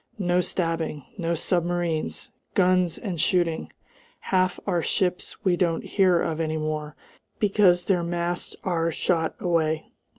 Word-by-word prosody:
No 180 -2 +2
stabbing! 165 -5 -2
No 170 -1 0
submarines! 175 -1 -1 0.2
Guns 180 -2 +3
and 180 -7 -3
shooting! 175 -3 +1 0.5
Half 185 -1 +1
our 175 -4 +1
ships 180 +2 -1
we 185 -2 +4
don't 170 -2 0
hear 185 -4 +3
of 160 -1 -1
any 160 -1 -1
more, 155 -1 -3 0.4
because 195 -4 +4
their 185 -3 +2
masts 175 +1 -2
are 165 -3 0
shot 165 -1 0
away. 160 -3 0
175 Hz, 130 wpm, -25 LUFS, 165-180 Hz, 0.5 s, we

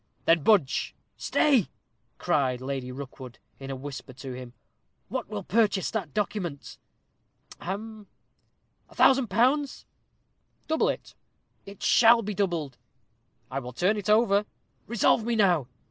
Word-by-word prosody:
"Then 165 -1 +4
budge." 170 -6 +2 0.2
"Stay!" 265 - +2 0.5
cried 135 -7 0
Lady 130 -1 -4
Rookwood, 130 -2 -9 0.2
in 135 0 -8
a 135 - -3
whisper 135 -1 -8
to 130 +1 -8
him. 125 -1 -9 0.6
"What - - -4
will 100 - -5
purchase 205 -3 +1
that 195 -10 -3
document?" 180 -6 -4 0.8
"Hem!" 210 +3 -6 0.8
"A - - -18
thousand 265 -2 +5
pounds?" 260 +8 +1 0.8
"Double 320 +1 +2
it." - - -5 0.5
"It 200 0 -10
shall 230 0 +6
be 210 +1 -3
doubled." 170 -9 -2 0.7
"I 135 - -2
will 125 -1 -8
turn 180 - +1
it 205 -1 -4
over." 210 -2 +3 0.4
"Resolve 230 0 +2
me 235 +1 -1
now." 180 - +3
190 Hz, 130 wpm, -27 LUFS, 135-220 Hz, 0.8 s, shall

